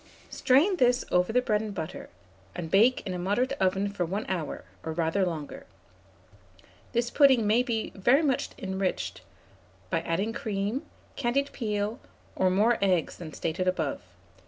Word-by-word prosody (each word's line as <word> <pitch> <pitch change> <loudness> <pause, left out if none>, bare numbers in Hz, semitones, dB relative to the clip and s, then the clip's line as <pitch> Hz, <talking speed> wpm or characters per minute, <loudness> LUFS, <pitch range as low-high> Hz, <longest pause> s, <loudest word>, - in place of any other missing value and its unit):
Strain 315 +10 +3
this 250 -3 +3
over 180 +3 +2
the 250 +2 +2
bread 210 -4 +1
and 215 -2 -5
butter, 160 -2 -6 0.5
and 165 -2 -5
bake 230 +6 +4
in 185 - -3
a 180 - -4
moderate 210 +9 0
oven 190 +2 +1
for 200 -3 -2
1 195 +5 -3
hour, 170 -5 -3 0.2
or 160 - -3
rather 165 +4 +1
longer. 160 -5 -4 1.2
This 235 0 0
pudding 265 -6 +5
may 220 +4 +4
be 235 -3 -2
very 245 +10 +3
much 270 -4 +1
enriched 190 -1 -3 0.7
by 165 - +1
adding 190 +7 -1
cream, 210 +3 -3 0.3
candied 275 +4 0
peel, 210 +1 -2 0.4
or 185 - +3
more 215 +5 +3
eggs 185 -4 +1
than 160 -3 -8
stated 170 +3 -2
above. 165 -6 -1
205 Hz, 155 wpm, -28 LUFS, 180-240 Hz, 1.2 s, pudding